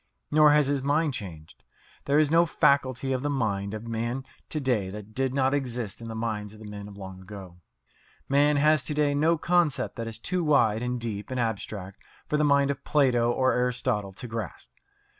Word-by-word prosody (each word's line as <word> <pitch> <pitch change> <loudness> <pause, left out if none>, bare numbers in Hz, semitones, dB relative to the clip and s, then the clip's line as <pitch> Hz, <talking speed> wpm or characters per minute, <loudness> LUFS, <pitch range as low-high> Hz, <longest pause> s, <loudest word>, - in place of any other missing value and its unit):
Nor 150 0 +6
has 150 -1 +4
his 140 0 0
mind 145 +2 +1
changed. 80 -9 -9 0.4
There 140 +1 +2
is 155 -1 +3
no 170 +1 +5
faculty 135 -3 +2
of 130 - -1
the 145 - -1
mind 105 -7 -1
of 110 - -7
man 115 +3 -3 0.2
to 155 - -1
day 120 -9 0
that 105 +2 -9
did 130 +2 0
not 135 0 +1
exist 120 -7 -3
in 115 - -7
the 115 - -6
minds 110 -2 -3
of - - -15
the 110 - -11
men 105 -1 -8
of 100 -1 -12
long 95 -1 -9
ago. 95 -2 -11 0.7
Man 145 +1 +3
has 150 0 +4
to 150 - -3
day 145 -1 +2
no 160 +4 +2
concept 170 -5 +1
that 115 -1 -4
is 115 - -4
too 180 +9 -2
wide 120 -8 +3
and 125 0 -2
deep 110 -3 -5
and 130 -1 -3
abstract 100 -4 -4 0.3
for 150 - 0
the 150 - +2
mind 140 -1 +3
of 140 - -7
Plato 125 -5 +2
or 130 +1 +2
Aristotle 125 -5 -1
to 120 - -8
grasp. 110 -6 -6
125 Hz, 205 wpm, -27 LUFS, 105-145 Hz, 0.7 s, Nor